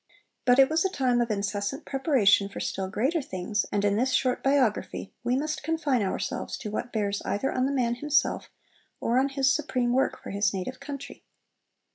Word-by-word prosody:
But 245 0 +5
it 270 -1 +7
was 320 +2 +1
a 385 - +1
time 255 -8 +1
of 235 - 0
incessant 205 +4 -2
preparation 245 - +3
for - - -7
still 190 -1 -2
greater 260 - 0
things, 190 -2 -2
and 205 0 +1
in 205 0 +2
this 255 +3 +1
short 255 -1 +1
biography 270 -8 0
we 240 +1 +1
must 305 +2 -2
confine 315 -7 0
ourselves 195 - -3
to 210 - -6
what 240 +3 -4
bears 205 -2 -1
either 235 +7 -1
on 255 +1 +1
the - - -1
man 245 -4 +1
himself 295 +4 0 0.5
or 240 +2 +2
on 270 +1 +2
his 270 -1 +2
supreme 255 -5 0
work 265 +1 +1
for - - -8
his 200 0 +1
native 255 +8 -4
country. 280 0 -8
250 Hz, 190 wpm, -27 LUFS, 205-275 Hz, 0.5 s, it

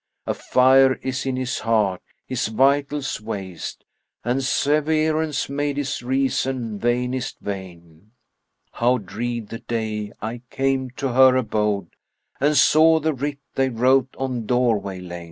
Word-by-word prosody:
A - - 0
fire 130 +1 +4
is 130 0 -3
in 130 - 0
his 130 -1 -2
heart, 110 -5 +1 0.2
his 130 -4 -2
vitals 140 +3 +1
waste, 100 -5 -6 0.2
* - - -41
And 125 +3 0
severance 155 +2 +1
made 145 0 -2
his 145 -3 -2
reason 130 -3 -1
vainest 125 +2 -1
vain. 90 -2 -8 0.6
How 125 +2 +2
dread 115 +2 -4
the 115 - -6
day 110 -3 -3
I 115 +2 -5
came 135 -1 0
to 135 - -1
her 130 +1 +6
abode 105 -6 0 0.3
* - - -41
And 145 +1 +3
saw 160 +4 +6
the 160 +1 0
writ 140 +2 -3 0.2
they 135 0 +1
wrote 130 +2 +2
on 125 -4 -3
doorway 110 -7 0
lain! 90 -1 -7
125 Hz, 140 wpm, -22 LUFS, 110-135 Hz, 0.6 s, her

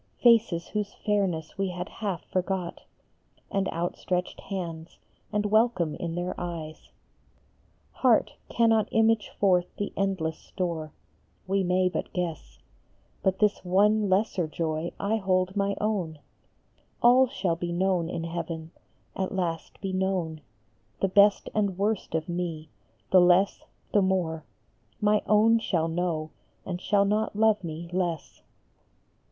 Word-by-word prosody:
69 240 -1 +7
Faces 170 -6 -6
whose 210 -1 -3
fairness 195 -5 -1
we 195 -1 +1
had 180 +1 -5
half 200 -7 -4
forgot, 185 -1 -3 0.7
And 195 -1 0
outstretched 180 +1 -2
hands, 170 -4 -6 0.3
and 210 0 0
welcome 210 -7 +2
in 170 -1 -4
their 175 +1 -2
eyes; 165 -3 -6 1.0
Heart 245 -4 +3 0.2
cannot 225 -2 +3
image 225 -1 +2
forth 180 -3 +3
the 205 - -3
endless 185 -5 -1
store 165 -4 -4 0.5
We 195 +1 +1
may 185 +1 +2
but 180 - -3
guess; 160 - -4 0.6
But 190 0 +1
this 210 -2 +1
one 205 +3 +3
lesser 190 -3 +1
joy 160 +1 -2
I 210 +3 +1
hold 185 -1 0
my 200 0 +1
own: 190 -7 -1 0.9
All 250 +2 +7
shall 190 -10 -1
be 175 +1 -4
known 180 -1 +1
in 165 - -3
heaven; 165 -1 -5 0.4
at 190 -1 -2
last 170 -4 -3
be 195 -1 -3
known 185 -4 -1 0.6
The 195 - +1
best 200 +2 +5
and 200 -4 0
worst 205 -4 -1
of 160 -1 -1
me; 170 -3 -4 0.4
the 185 - +7
less, 180 +3 +3 0.3
the 205 - +5
more, 175 -4 0 0.5
My 210 0 +3
own 225 +2 +5
shall 170 -7 0
know 165 -2 -2 0.3
and 180 -1 -4
shall 200 0 +3
not 210 +1 0
love 215 -2 +3
me 165 0 -6
less. 175 -4 -2
185 Hz, 135 wpm, -27 LUFS, 170-205 Hz, 1.0 s, 69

